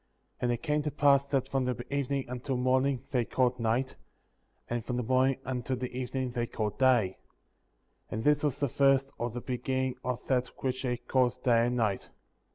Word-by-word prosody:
And 120 - +1
it 120 - -3
came 150 -1 +1
to 150 - -1
pass 140 -1 +4
that 135 -2 0
from 135 -1 0
the 120 -1 -3
evening 140 -1 -1
until 125 +2 -3
morning 130 +1 +2
they 125 -3 +2
called 125 +1 +1
night; 120 +3 0 0.7
and 120 -1 -2
from 125 +2 -3
the 125 - -1
morning 130 +2 +3
until 130 0 -2
the 125 0 -5
evening 130 0 -2
they 120 -1 -2
called 105 -3 -3
day; 120 -8 +3 0.9
and 110 - -3
this 150 +1 +4
was 145 -4 +1
the 140 - +2
first, 135 +1 +3
or 120 - -1
the 120 +1 -6
beginning, 130 0 -2
of 125 -1 -3
that 125 -2 +1 0.2
which 130 -1 -1
they 125 -2 -1
called 125 +1 0
day 120 -1 +4
and 125 0 -1
night. 105 -5 0
125 Hz, 190 wpm, -30 LUFS, 120-135 Hz, 0.9 s, pass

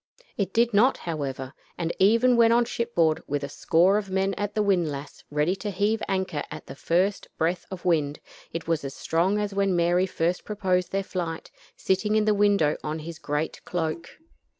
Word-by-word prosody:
It 200 -2 -1
did 235 +2 +2
not, 240 +6 +4
however, 135 -5 -4 0.2
and 170 -1 -2
even 230 +6 +5
when 230 -1 +5
on 235 +1 +4
shipboard, 170 -10 0
with 145 0 -2
a 140 - -4
score 180 +7 +3
of 200 -2 -7
men 190 +1 0
at 205 +1 -3
the 215 - +2
windlass 160 -8 -1
ready 150 +5 +1
to 205 +2 -4
heave 205 +3 0
anchor 190 -6 -1
at - - -8
the - - -8
first 180 +7 0
breath 170 +2 -1
of 185 -2 -8
wind, 150 -4 +1 0.3
it 165 - -5
was 165 -3 0
as 135 0 -6
strong 175 +5 +1
as 205 -1 -2
when 195 -2 +1
Mary 175 +2 +2
first 175 0 -1
proposed 185 -4 -1
their 195 0 0
flight, 170 -4 -4 0.3
sitting 210 +3 +1
in 215 -1 +3
the 215 - +4
window 200 -7 +3
on 150 +1 -3
his 160 +1 -8
great 150 -1 -3
cloak. 165 -1 -3
180 Hz, 190 wpm, -26 LUFS, 160-205 Hz, 0.3 s, even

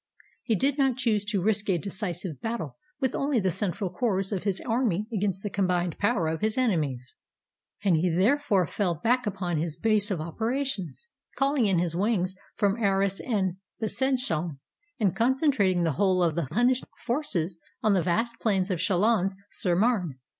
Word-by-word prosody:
He 225 - 0
did 275 +7 +1
not 265 -3 +2
choose 220 -5 +1
to 205 -4 -1
risk 205 0 +1
a 185 - +3
decisive 180 - -4
battle 225 - -3 0.2
with 265 -3 0
only 275 -3 +1
the 190 -2 +1
central 190 +1 -2
corps 195 -1 -1
of 195 0 -3
his 195 -2 0
army 225 -5 0
against 195 -2 -1
the 205 - -2
combined 180 -3 0
power 205 -4 +2
of 160 0 -2
his 215 +2 0
enemies, 150 - 0 0.7
and 190 -4 +4
he 170 +3 +2
therefore 200 - +2
fell 180 -1 -1
back 235 +8 +1
upon 185 -4 -2
his 160 -1 -2
base 215 -2 +2
of 190 -5 -1
operations, 230 - -3 0.2
calling 275 -4 +2
in 190 -3 +2
his 170 -1 0
wings 190 -1 0 0.2
from 205 +3 +1
Arras 195 -1 +2
and 190 -6 -1 0.2
Besangon, 220 - 0 0.4
and 200 -5 +2
concentrating 235 - +2
the 165 - +2
whole 185 +2 +2
of 165 -2 +2
the 165 -3 -2
Hunnish 245 +6 +3 0.2
forces 195 - -1 0.2
on 215 - +4
the 190 - +3
vast 225 +7 0
plains 195 -3 +1
of 180 - -1
Chalons 195 +2 +2 0.2
sur 175 -2 0
Marne. 190 - +1
200 Hz, 170 wpm, -27 LUFS, 175-230 Hz, 0.7 s, and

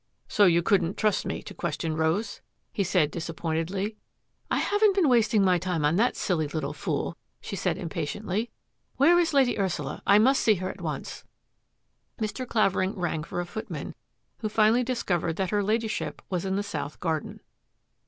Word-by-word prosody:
" - - -45
So 205 - +7
you 170 -2 +4
couldn't 185 -1 +2
trust 215 -2 +1
me - - -4
to - - -9
question 155 -1 -3
Rose? 160 +7 -1
" - - -48
he 200 - 0
said 175 -5 +2
disappointedly. 170 +5 -3 0.3
" - - -49
I - - +1
haven't 410 -1 +3
been 375 -6 +4
wasting 225 -4 +4
my 180 -2 +3
time 175 -4 -1
on 150 +3 +3
that 240 +4 +2
silly 160 -5 0
little 150 -1 -3
fool," 145 - -2 0.2
she - - -6
said - - -1
impatiently. 190 +6 -3 0.2
" - - -48
Where 335 +6 +6
is 340 -1 +2
Lady 265 -6 +3
Ursula? 175 -7 -2
I 200 - +7
must 260 +6 +4
see 215 - +4
her 185 0 -3
at - - -13
once." - - -5 1.0
Mr. 220 +4 -3
Clavering 195 -4 +1
rang 175 -4 -2
for 175 +2 -3
a - - -4
footman, 220 +5 -6 0.5
who 215 - -2
finally 220 +3 +4
discovered 180 -10 -1
that 190 0 -2
her 205 -1 +2
Ladyship 220 +2 -2
was 180 0 -1
in 190 0 0
the 200 - 0
south 150 -7 -5
garden. 160 -3 -2
190 Hz, 185 wpm, -27 LUFS, 165-220 Hz, 1.0 s, So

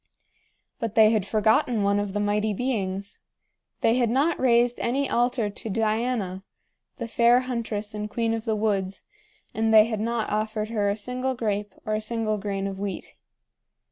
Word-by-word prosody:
But 225 -2 -3
they 220 -1 +7
had 210 -4 0
forgotten 220 +1 +2
one 200 0 +2
of 205 -1 -3
the 205 - -1
Mighty 205 +1 0
Beings. 200 -5 -3 0.6
They 230 +2 +3
had 240 -3 +2
not 285 +7 +1
raised 240 -1 +3
any 270 +4 0
altar 240 -2 +1
to 205 +2 -7
Diana, 215 -2 -1 0.5
the 235 -4 -4
fair 235 +2 +4
huntress 230 -4 -3
and 210 0 -4
queen 230 +1 0
of 225 -1 -3
the 220 -2 0
woods, 200 -3 -1 0.5
and 220 0 +1
they 215 -1 +8
had 220 -2 -3
not 230 0 -1
offered 215 0 -1
her 210 -3 0
a 200 - -1
single 250 +4 -2
grape 210 -3 -2
or 215 - -1
a 215 - 0
single 215 -1 -1
grain 195 -1 -3
of 195 -1 -4
wheat. 200 -1 -5
220 Hz, 170 wpm, -25 LUFS, 205-235 Hz, 0.6 s, they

